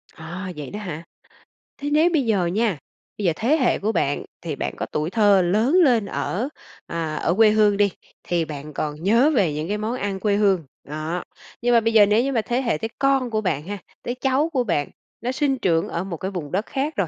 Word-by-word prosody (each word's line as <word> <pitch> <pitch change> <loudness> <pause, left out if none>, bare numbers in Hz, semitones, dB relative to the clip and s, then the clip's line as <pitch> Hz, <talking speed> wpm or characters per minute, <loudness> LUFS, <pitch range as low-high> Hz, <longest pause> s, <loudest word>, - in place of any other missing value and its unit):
Ờ, 180 +4 -6
vậy 150 -3 -6
đó 210 - -5
hả? 170 -6 -6 0.7
Thế 285 +1 -3
nếu 310 +4 +4
bây 290 -6 +2
giờ 205 -6 +2
nha, 200 +1 0 0.4
bây 205 - -3
giờ 170 - +3
thế 255 - +2
hệ 260 -5 +2
của 210 +3 0
bạn 145 -9 0 0.2
thì 160 -4 -4
bạn - - -3
có - - -3
tuổi 150 +2 -2
thơ 205 -2 +4
lớn 210 - +2
lên 240 -8 +3
ở, 215 +5 -2 0.4
à, 165 -2 -3
ở 165 - 0
quê 220 +2 +6
hương 210 -1 +4
đi 200 -1 +3 0.3
thì 170 -2 0
bạn 150 0 -8
còn 150 +2 -4
nhớ 230 - +4
về 185 -10 +2
những 155 +2 -3
cái 205 +2 -1
món 215 +3 -2
ăn 200 -5 -3
quê 205 0 +1
hương. 195 -4 +3 0.2
Đó, 155 +4 -4 0.4
nhưng 245 0 +2
mà 235 - +7
bây 225 0 0
giờ 215 -2 +8
nếu 210 +3 +3
như 275 - -1
mà 235 -4 +1
thế 240 +4 -1
hệ 235 - 0
tới 225 - -4
con 270 -2 +2
của 215 -1 -1
bạn 160 -8 -1
ha, 205 +1 -4 0.3
tới 245 - -3
cháu 270 +5 +1
của 255 -3 +2
bạn, 165 -10 -1 0.3
nó 245 +3 -1
sinh 270 0 0
trưởng 165 -8 +1
ở 170 - -3
một 185 -3 -5
cái 190 +4 -4
vùng 165 -7 -5
đất 200 +4 0
khác 285 +3 -2
rồi 195 - 0
205 Hz, 240 wpm, -23 LUFS, 170-240 Hz, 0.7 s, giờ